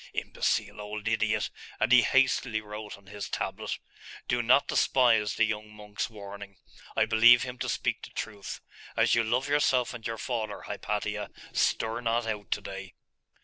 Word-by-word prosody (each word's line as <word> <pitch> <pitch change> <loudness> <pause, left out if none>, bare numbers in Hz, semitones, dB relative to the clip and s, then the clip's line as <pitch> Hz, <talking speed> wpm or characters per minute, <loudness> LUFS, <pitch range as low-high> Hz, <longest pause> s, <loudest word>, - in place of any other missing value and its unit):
'Imbecile - - -1
old 105 +1 -5
idiot!' 110 -1 +1 0.3
and 120 - +1
he 125 0 +9
hastily 130 -2 +2
wrote 105 0 -8
on 100 - -21
his 100 0 -7
tablet - - -3 0.5
'Do 120 - +1
not 125 +4 +4
despise 115 -5 +3
the - - +3
young 105 -1 -4
monk's 105 -1 -5
warning. 100 -2 -9 0.4
I - - +4
believe 120 +2 +7
him 125 -1 -6
to - - -2
speak - - -1
the - - -9
truth. 105 -3 -6 0.4
As - - +4
you 115 - +4
love 125 +5 0
yourself 135 -4 +2
and 115 -3 -5
your 115 - -4
father, 110 -4 -3
Hypatia, 105 0 -3 0.2
stir 115 +1 +1
not 115 0 +1
out 105 -2 -4
to 105 - 0
day. 95 -1 -8
110 Hz, 165 wpm, -29 LUFS, 105-120 Hz, 0.5 s, he